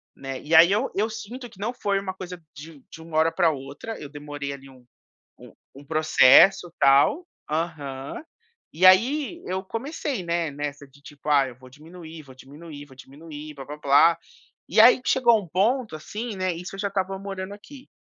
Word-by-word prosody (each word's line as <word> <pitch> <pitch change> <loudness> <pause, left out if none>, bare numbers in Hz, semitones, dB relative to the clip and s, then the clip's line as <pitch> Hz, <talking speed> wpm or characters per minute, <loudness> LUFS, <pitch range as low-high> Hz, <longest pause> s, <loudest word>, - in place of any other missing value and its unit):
né. 135 -1 -7
E 155 +3 -5
aí 170 +3 +8
eu 205 - 0
eu 215 +3 0
sinto 240 +3 -8
que 195 - -20
não 230 +4 -3
foi 200 -4 -1
uma 195 -1 -5
coisa 180 -1 -9
de 150 +3 -11
um 140 - -19
de 160 - -11
uma 160 -1 -6
hora 160 +1 +3
para 170 - +2
outra, 140 +10 -8
eu 145 - -9
demorei 145 -1 -7
ali 135 0 -12
um 130 -2 -19 0.5
um - - -14 0.2
um 140 - -13
processo, 155 +3 +5
tal. 140 - +4 0.2
Aham. 150 - -4 0.5
E 175 +4 +2
aí 275 - +4
eu 190 +1 -3
comecei, 260 - -5
né, 170 -1 -1
nessa 145 0 -6
de, 140 +1 -23
tipo: 145 +1 -14
"Ah, 140 -2 +4
eu 125 - -10
vou 130 0 -16
diminuir, 160 +3 -12
vou 130 -2 -16
diminuir, 145 +3 -12
vou 135 -2 -18
diminuir, 150 +3 -11
blá-blá-blá". 145 +3 +2 0.5
E - - +2
aí 250 +2 +6
que - - -3
chegou 235 -4 +4
um 190 - -12
ponto, 215 - 0
assim, 210 +8 -6
né 185 -1 -1
isso 180 +3 -8
eu 195 - -10
já 200 - -2
estava 195 0 -3
morando 195 0 -6
aqui, 260 +6 -14
165 Hz, 195 wpm, -24 LUFS, 145-200 Hz, 0.5 s, aí